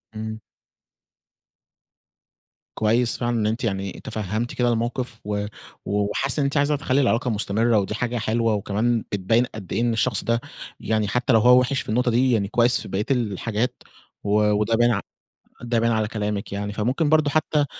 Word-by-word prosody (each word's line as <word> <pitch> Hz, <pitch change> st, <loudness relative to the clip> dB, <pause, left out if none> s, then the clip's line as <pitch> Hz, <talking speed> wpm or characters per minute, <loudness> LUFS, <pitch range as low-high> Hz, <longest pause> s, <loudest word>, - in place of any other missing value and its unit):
إمم. 110 Hz, 0 st, -5 dB, 2.4 s
كويس 115 Hz, +2 st, +1 dB
فعلًا 120 Hz, -1 st, -1 dB
إن 105 Hz, -, +1 dB
أنتِ 115 Hz, +4 st, -2 dB
يعني 95 Hz, -4 st, -3 dB
تفهّمتِ 110 Hz, +3 st, -3 dB
كده 120 Hz, -1 st, +1 dB
الموقف، 120 Hz, 0 st, -3 dB
و 105 Hz, 0 st, -2 dB, 0.4 s
وحاسّة 105 Hz, +8 st, 0 dB
إن -, -, +2 dB
أنتِ 140 Hz, +2 st, 0 dB
عايزة 145 Hz, +1 st, +2 dB
تخلّي 135 Hz, -1 st, +1 dB
العلاقة 125 Hz, -1 st, +1 dB
مستمرة، 110 Hz, +2 st, +2 dB
ودي 100 Hz, +2 st, -2 dB
حاجة 120 Hz, 0 st, -2 dB
حلوة 115 Hz, 0 st, +1 dB
وكمان 110 Hz, +3 st, 0 dB
بتبيّن 110 Hz, +5 st, +2 dB
قد 105 Hz, -6 st, -9 dB
إيه 115 Hz, -, 0 dB
إن 120 Hz, -1 st, +1 dB
الشخص 115 Hz, -1 st, 0 dB
ده، 115 Hz, 0 st, 0 dB, 0.4 s
يعني 110 Hz, -1 st, 0 dB
حتّى 125 Hz, +2 st, +1 dB
لو 115 Hz, -, +6 dB
هو 125 Hz, +3 st, +6 dB
وحِش 130 Hz, +2 st, 0 dB
في -, -, -10 dB
النقطة 120 Hz, +2 st, +1 dB
دي 125 Hz, +2 st, +3 dB
يعني 100 Hz, -4 st, +1 dB
كويّس 120 Hz, +3 st, +2 dB
في -, -, -8 dB
بقية 100 Hz, +2 st, -2 dB
الحاجات، 115 Hz, 0 st, -1 dB, 0.4 s
و 100 Hz, -, -2 dB, 0.2 s
وده 105 Hz, +2 st, +1 dB
باين 120 Hz, +1 st, +4 dB
ع 105 Hz, -, +1 dB, 0.6 s
ده 120 Hz, -1 st, 0 dB
بان 115 Hz, 0 st, +2 dB
على 110 Hz, -1 st, +1 dB
كلامِك 105 Hz, -1 st, -3 dB
يعني، 100 Hz, +1 st, -3 dB
فممكن 130 Hz, +9 st, 0 dB
برضه 155 Hz, -2 st, +3 dB
حتّى 150 Hz, -1 st, +1 dB
115 Hz, 175 wpm, -23 LUFS, 105-125 Hz, 2.4 s, لو